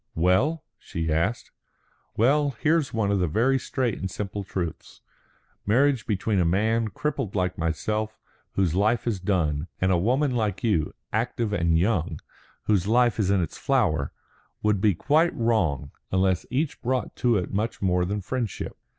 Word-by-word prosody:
"Well?" 95 Hz, -, +2 dB, 0.2 s
she 80 Hz, -2 st, -3 dB
asked. 100 Hz, +9 st, -1 dB, 0.7 s
"Well, 140 Hz, +4 st, +3 dB
here's 155 Hz, -2 st, +2 dB
one 110 Hz, -3 st, 0 dB
of 100 Hz, -, +2 dB
the 90 Hz, -, +1 dB
very 125 Hz, -, +2 dB
straight 125 Hz, -5 st, -2 dB
and 95 Hz, -, -3 dB
simple 100 Hz, +1 st, -4 dB
truths. 90 Hz, -4 st, -5 dB, 0.6 s
Marriage 130 Hz, +3 st, +2 dB
between 105 Hz, -1 st, 0 dB
a -, -, +4 dB
man 110 Hz, +6 st, +1 dB
crippled 125 Hz, 0 st, -3 dB
like 90 Hz, -1 st, 0 dB
myself, 105 Hz, +7 st, -2 dB, 0.4 s
whose 95 Hz, -5 st, +1 dB
life 110 Hz, +5 st, +2 dB
is 110 Hz, -5 st, -1 dB
done, 85 Hz, -5 st, 0 dB
and 95 Hz, 0 st, +2 dB
a 90 Hz, -, +3 dB
woman 130 Hz, -, +2 dB
like 105 Hz, -5 st, -1 dB
you, 95 Hz, -10 st, +1 dB, 0.2 s
active 115 Hz, -1 st, -1 dB
and 85 Hz, -4 st, +2 dB
young, 90 Hz, -1 st, 0 dB, 0.4 s
whose 100 Hz, -3 st, +1 dB
life 120 Hz, 0 st, +3 dB
is 100 Hz, -3 st, +2 dB
in 100 Hz, -2 st, +3 dB
its 80 Hz, -, -6 dB
flower, 95 Hz, -, +1 dB, 0.5 s
would 105 Hz, -2 st, +2 dB
be 105 Hz, -4 st, +3 dB
quite 155 Hz, -, +2 dB
wrong 95 Hz, -, 0 dB, 0.2 s
unless 95 Hz, -1 st, +1 dB
each 140 Hz, +4 st, -1 dB
brought 130 Hz, +1 st, -1 dB
to 120 Hz, -3 st, +3 dB
it 90 Hz, 0 st, -3 dB
much 110 Hz, +4 st, -1 dB
more 90 Hz, -2 st, +2 dB
than 100 Hz, +3 st, -2 dB
friendship. 115 Hz, 0 st, -4 dB
105 Hz, 160 wpm, -25 LUFS, 90-120 Hz, 0.7 s, a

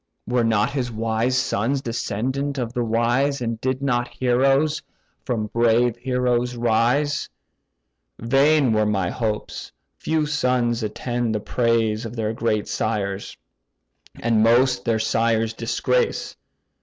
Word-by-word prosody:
Were 125 Hz, 0 st, +1 dB
not 115 Hz, +4 st, +1 dB, 0.2 s
wise 115 Hz, +3 st, 0 dB
sons 125 Hz, +2 st, 0 dB
descendant 130 Hz, +5 st, -2 dB
of 120 Hz, -2 st, -3 dB
the 125 Hz, -1 st, -1 dB
wise, 120 Hz, +5 st, +1 dB
And 115 Hz, -2 st, -3 dB
did 130 Hz, +1 st, -1 dB
not 120 Hz, -3 st, +1 dB
heroes 135 Hz, +5 st, +1 dB, 0.4 s
from 115 Hz, -5 st, -1 dB
brave 115 Hz, 0 st, +3 dB
heroes 125 Hz, -1 st, 0 dB
rise, 120 Hz, +5 st, +1 dB, 0.9 s
Vain 135 Hz, +2 st, +3 dB
were 110 Hz, 0 st, +2 dB
my 95 Hz, -4 st, 0 dB
hopes: 110 Hz, -3 st, -4 dB, 0.3 s
few 155 Hz, -1 st, 0 dB
sons 125 Hz, -5 st, 0 dB
attain 120 Hz, +2 st, -2 dB
the 110 Hz, -, -1 dB
praise 115 Hz, -1 st, 0 dB
Of 115 Hz, 0 st, -7 dB
their 110 Hz, -1 st, -2 dB
great 110 Hz, -2 st, -1 dB
sires, 100 Hz, -2 st, -3 dB, 0.8 s
and 115 Hz, -2 st, +2 dB
most 125 Hz, +3 st, +3 dB
their 115 Hz, -2 st, +2 dB
sires 115 Hz, 0 st, +1 dB
disgrace. 120 Hz, +2 st, -1 dB
120 Hz, 120 wpm, -22 LUFS, 110-125 Hz, 0.9 s, brave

